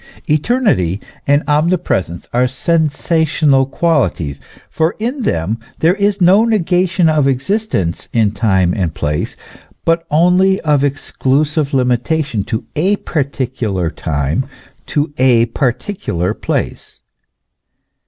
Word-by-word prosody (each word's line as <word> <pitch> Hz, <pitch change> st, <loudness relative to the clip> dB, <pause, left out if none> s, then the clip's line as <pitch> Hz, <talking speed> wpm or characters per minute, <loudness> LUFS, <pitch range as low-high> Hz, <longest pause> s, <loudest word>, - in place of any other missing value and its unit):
Eternity 150 Hz, -, +1 dB, 0.3 s
and 145 Hz, +1 st, +3 dB
omnipresence 150 Hz, -, 0 dB
are 125 Hz, +1 st, +3 dB
sensational 155 Hz, -1 st, +1 dB
qualities, 135 Hz, -, 0 dB, 0.3 s
for 160 Hz, +2 st, -1 dB
in 245 Hz, +5 st, -3 dB
them 100 Hz, -, -1 dB, 0.2 s
there 165 Hz, +3 st, +3 dB
is 200 Hz, 0 st, 0 dB
no 190 Hz, +4 st, +5 dB
negation 185 Hz, -5 st, +2 dB
of 155 Hz, -3 st, +2 dB
existence 135 Hz, -, -1 dB
in 110 Hz, -3 st, +2 dB
time 95 Hz, -4 st, +1 dB
and 90 Hz, -7 st, -2 dB
space, 75 Hz, +1 st, -2 dB, 0.5 s
but 165 Hz, 0 st, +1 dB
only 180 Hz, +4 st, +3 dB
of 150 Hz, -3 st, +2 dB
exclusive 145 Hz, +1 st, 0 dB
limitation 125 Hz, -1 st, 0 dB
to 110 Hz, +2 st, -4 dB
a 185 Hz, +7 st, +2 dB
particular 125 Hz, -, -2 dB
time, 75 Hz, -, -2 dB, 0.4 s
to 145 Hz, 0 st, -1 dB
a 125 Hz, -3 st, +4 dB
particular 120 Hz, -, -2 dB
place. -, -, -4 dB
145 Hz, 105 wpm, -16 LUFS, 115-170 Hz, 0.5 s, no